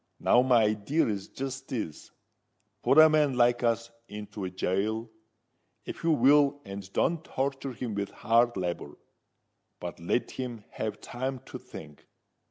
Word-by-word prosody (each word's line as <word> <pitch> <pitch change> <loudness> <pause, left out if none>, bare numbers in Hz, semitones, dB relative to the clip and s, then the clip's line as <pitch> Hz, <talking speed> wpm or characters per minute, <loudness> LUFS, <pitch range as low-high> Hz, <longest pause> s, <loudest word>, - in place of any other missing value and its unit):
Now 120 - +5
my 125 -3 +4
idear 105 +9 +1
is 100 -3 -3
jist 135 0 -6
this:—Put 115 - -5
a 155 0 +10
man 150 -4 +2
like 120 0 +4
us 115 -1 0 0.2
into 105 -2 -6
gaol, 105 +5 -1 0.7
if - - -7
you 165 - +2
will 145 0 +5
and 100 -1 -8
don't 165 +9 +1
torture 135 -1 -3
him 120 -2 -4
with 100 0 -2
hard 115 0 +2
labour: 90 -2 -4 0.8
but 85 -1 -6
let 85 +8 -1
him 120 -4 -5
have 110 -1 -4
time 130 +2 -4
to - - -8
think. 75 - -12
120 Hz, 140 wpm, -29 LUFS, 105-135 Hz, 0.8 s, a